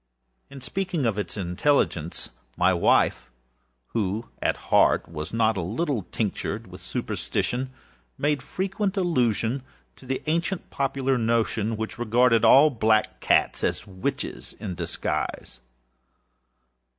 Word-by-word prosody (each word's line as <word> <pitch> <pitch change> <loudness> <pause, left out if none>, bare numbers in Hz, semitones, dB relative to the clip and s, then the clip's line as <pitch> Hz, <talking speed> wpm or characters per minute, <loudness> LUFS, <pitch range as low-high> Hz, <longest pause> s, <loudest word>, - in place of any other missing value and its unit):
In 140 -1 -10
speaking 185 -3 -2
of 110 -3 +1
his 105 0 -4
intelligence, 90 - 0 0.3
my 90 +1 +4
wife, 65 -7 +2 0.6
who 110 +1 -2
at - - +1
heart - - +4
was 80 -1 -6
not 110 -1 +2
a - - 0
little 115 - -2
tinctured 105 -4 -2
with - - -12
superstition, 130 +2 -2 0.5
made 145 -1 +1
frequent 195 +4 -2
allusion 125 - +1 0.4
to 130 - -15
the 130 0 -2
ancient 170 +4 -1
popular 135 -1 0
notion, 115 -1 +1
which 110 +2 -5
regarded 120 0 +3
all 150 +3 +7
black 110 -3 +2
cats - - +2
as - - 0
witches 95 -1 -4
in 90 - -4
disguise. 80 - -3
115 Hz, 120 wpm, -25 LUFS, 105-140 Hz, 0.6 s, all